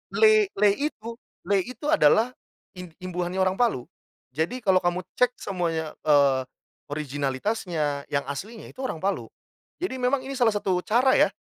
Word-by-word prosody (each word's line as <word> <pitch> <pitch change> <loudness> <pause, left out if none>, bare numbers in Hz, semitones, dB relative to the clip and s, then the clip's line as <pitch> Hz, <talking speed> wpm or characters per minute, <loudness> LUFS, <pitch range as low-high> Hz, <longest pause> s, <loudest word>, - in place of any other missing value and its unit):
Le 435 -1 +6
le 205 +1 +5
itu 230 -6 -4 0.3
le 200 +2 +2
itu 255 +5 -4
adalah 250 -6 +4 0.5
im 180 - -7 0.2
imbuhannya 180 0 -3
orang 185 0 +1
Palu. 230 - +2 0.5
Jadi 160 - -2
kalau 190 -2 +4
kamu 175 0 -1 0.2
cek 250 0 +3
semuanya, 165 -5 -2 0.2
eee, 140 -3 +5 0.5
originalitasnya, 145 - -2
yang 140 -1 -1
aslinya 205 +11 -7
itu - - -20
orang 260 -10 -3
Palu. 200 +1 -1 0.5
Jadi 260 -8 -3
memang 255 +1 +1
ini 270 - -6
salah 230 -3 +4
satu 190 -3 0
cara 250 +4 +4
ya - - +6
195 Hz, 150 wpm, -25 LUFS, 160-250 Hz, 0.5 s, Le